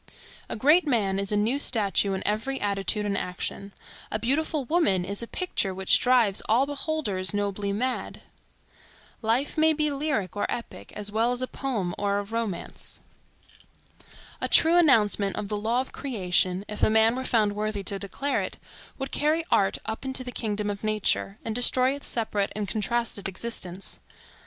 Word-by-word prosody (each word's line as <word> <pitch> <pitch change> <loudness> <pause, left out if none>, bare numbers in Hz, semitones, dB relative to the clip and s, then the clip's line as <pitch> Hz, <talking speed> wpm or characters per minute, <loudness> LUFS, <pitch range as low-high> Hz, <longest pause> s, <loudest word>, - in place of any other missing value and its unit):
A - - -3
great 300 +9 +4
man 200 -7 +1
is 200 0 -3
a 210 - +2
new 230 +7 +1
statue 205 -6 +2
in 190 - -4
every 225 +6 -1
attitude 205 +1 0
and 200 -1 0
action. 195 +2 -4 0.4
A - - -1
beautiful 280 +5 0
woman 240 - +2
is 200 +3 -5
a 235 - -5
picture 205 - -2
which 190 0 +4
drives 245 -6 +4
all 240 +5 +4
beholders 280 -10 -1
nobly 200 0 -1
mad. 250 +5 -3 1.0
Life 245 +7 0
may 315 0 +5
be 300 -1 +1
lyric 275 - -1
or 205 - 0
epic, 235 - -6
as 205 0 -4
well 225 +3 +2
as 250 +1 -2
a - - -1
poem 220 -12 -3
or 200 0 +1
a 205 - -1
romance. 215 -4 -5 1.4
A - - 0
true 325 +2 +5
announcement 210 - +4
of 200 - -4
the 210 - -1
law 230 +4 +1
of 265 - -8
creation, 185 -6 0
if 210 - -6
a - - +5
man 220 +2 +4
were 260 - -3
found 215 -5 +2
worthy 210 -1 -2
to 195 +1 -1
declare 275 +9 -1
it, - - -5 0.4
would 270 0 -5
carry 310 +3 +1
art 195 -1 +3
up 220 +3 -4
into 265 -1 -3
the 250 - -6
kingdom 210 -3 -2
of 200 +1 -7
nature, 215 -1 0
and 225 - -2
destroy 255 +2 +3
its 285 - -4
separate 210 -3 0
and 210 -1 -2
contrasted 215 -1 -1
existence. 190 -2 -4
215 Hz, 175 wpm, -26 LUFS, 200-260 Hz, 1.4 s, may